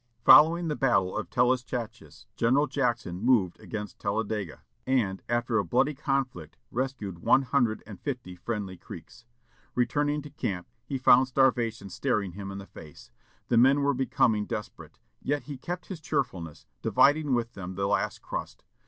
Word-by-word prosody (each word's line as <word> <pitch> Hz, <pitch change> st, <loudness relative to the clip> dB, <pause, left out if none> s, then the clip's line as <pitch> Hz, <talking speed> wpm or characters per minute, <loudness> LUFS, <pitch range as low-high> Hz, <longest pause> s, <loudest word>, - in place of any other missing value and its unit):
Following 165 Hz, +3 st, +7 dB
the 150 Hz, -, -1 dB
battle 100 Hz, -10 st, +1 dB
of -, -, -3 dB
Talluschatches, 125 Hz, -2 st, -1 dB
General 130 Hz, +5 st, +3 dB
Jackson 120 Hz, -10 st, -2 dB
moved 110 Hz, -7 st, +2 dB
against 105 Hz, -1 st, -7 dB
Talladega, 100 Hz, -3 st, -3 dB, 0.2 s
and, 110 Hz, -8 st, +1 dB
after 120 Hz, -1 st, +1 dB
a -, -, +1 dB
bloody 135 Hz, -, +1 dB
conflict, 130 Hz, -, -3 dB
rescued 120 Hz, -8 st, -3 dB
one 135 Hz, +10 st, +4 dB
hundred 125 Hz, -4 st, 0 dB
and 100 Hz, -3 st, -10 dB
fifty 120 Hz, -10 st, -5 dB
friendly 100 Hz, -1 st, -4 dB
Creeks. 115 Hz, -, -12 dB, 0.5 s
Returning 145 Hz, +4 st, 0 dB
to 150 Hz, -, -10 dB
camp, 95 Hz, -10 st, -4 dB, 0.2 s
he 135 Hz, -, -2 dB
found 130 Hz, 0 st, +5 dB
starvation 120 Hz, -6 st, +1 dB
staring 105 Hz, -5 st, -1 dB
him 100 Hz, +2 st, -7 dB
in 100 Hz, -, -6 dB
the 100 Hz, -, -8 dB
face. 75 Hz, -9 st, -14 dB, 0.4 s
The 120 Hz, -, +3 dB
men 135 Hz, +4 st, +5 dB
were 140 Hz, 0 st, +3 dB
becoming 115 Hz, -5 st, +1 dB
desperate; 105 Hz, -, -7 dB, 0.2 s
yet 145 Hz, 0 st, -1 dB
he 145 Hz, -, -7 dB
kept 175 Hz, +5 st, -5 dB
his 180 Hz, -5 st, -8 dB
cheerfulness, 95 Hz, -, -3 dB, 0.2 s
dividing 145 Hz, -2 st, +3 dB
with 120 Hz, -1 st, -2 dB
them 95 Hz, -1 st, -7 dB
the 100 Hz, +1 st, -1 dB
last 100 Hz, -, -1 dB
crust. -, -, -6 dB
120 Hz, 155 wpm, -28 LUFS, 100-135 Hz, 0.5 s, Following